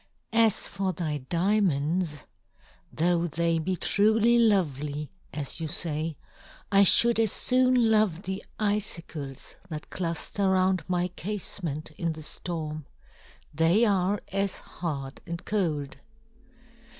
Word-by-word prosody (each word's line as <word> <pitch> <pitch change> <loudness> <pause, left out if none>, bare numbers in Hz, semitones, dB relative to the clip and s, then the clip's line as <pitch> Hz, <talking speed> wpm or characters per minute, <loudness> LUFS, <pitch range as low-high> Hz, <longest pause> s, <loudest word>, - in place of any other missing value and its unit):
As 225 -2 +3
for 195 -1 -2
thy 155 -3 -3
diamonds, 170 - 0 0.7
though 175 +1 +1
they 165 +1 0
be 185 +4 -1
truly 220 +5 +3
lovely, 150 - +1 0.2
as 150 +2 -2
you 160 - -2
say, 155 0 +2 0.5
I 200 0 +6
should 235 +4 +5
as 220 -3 +2
soon 255 -2 +3
love 210 -5 +2
the 190 +1 -4 0.2
icicles 170 - -3
that 155 -2 -7
cluster 185 +3 -2
round 185 -1 +1
my 180 0 0
casement 175 -5 -4
in 165 -2 -1
the 155 0 -10
storm. 155 -2 -5 0.7
They 165 +9 +3
are 195 -1 +1
as 195 0 -1
hard 140 -6 -6
and 170 +1 -6
cold." 160 -9 -1
175 Hz, 115 wpm, -27 LUFS, 155-205 Hz, 0.7 s, I